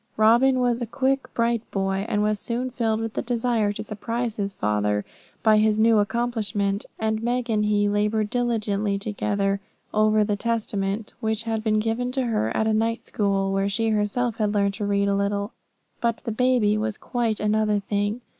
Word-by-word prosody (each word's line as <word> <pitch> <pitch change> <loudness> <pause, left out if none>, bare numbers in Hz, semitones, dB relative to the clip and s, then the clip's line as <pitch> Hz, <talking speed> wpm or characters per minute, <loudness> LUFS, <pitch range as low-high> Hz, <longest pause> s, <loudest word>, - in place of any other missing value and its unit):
Robin 240 +4 +5
was 245 -1 +1
a 240 - -2
quick, 270 +3 0
bright 230 -1 +1
boy, 195 +1 -1
and 210 0 +1
was 210 -1 +1
soon 245 +4 -2
filled 225 -3 0
with 225 -1 -3
the - - -1
desire 235 -3 0
to 205 - -5
surprise 230 +2 -3
his 200 -1 -3
father 105 0 0 0.4
by 215 -1 +5
his 215 0 +3
new 225 0 +5
accomplishment; 210 -2 -1
and 220 0 -1
Meg 240 0 -1
and 210 -1 +2
he 205 -1 +2
laboured 210 +1 0
diligently 215 -4 0
together 200 -1 -1 0.3
over 215 0 +4
the 210 0 0
Testament, 210 -2 -2
which 220 -1 -1
had 225 -1 -2
been 215 -1 +2
given 225 +3 -1
to 265 -1 +1
her 220 - 0
at 220 - +2
a 220 - +2
night 225 +2 0
school, 195 -2 0
where 195 +1 +1
she 225 +3 0
had - - +1
herself 225 +3 -1
learned 205 -2 +1
to 205 0 -3
read 200 0 +1
a 200 - +2
little. 200 +1 -1 0.5
But 235 -1 +1
with - - -23
the 230 - -1
baby 245 -2 +2
it - - +1
was 215 -1 -2
quite 235 -4 -1
another 210 0 +1
thing. 205 +3 -2
215 Hz, 190 wpm, -24 LUFS, 205-230 Hz, 0.5 s, Robin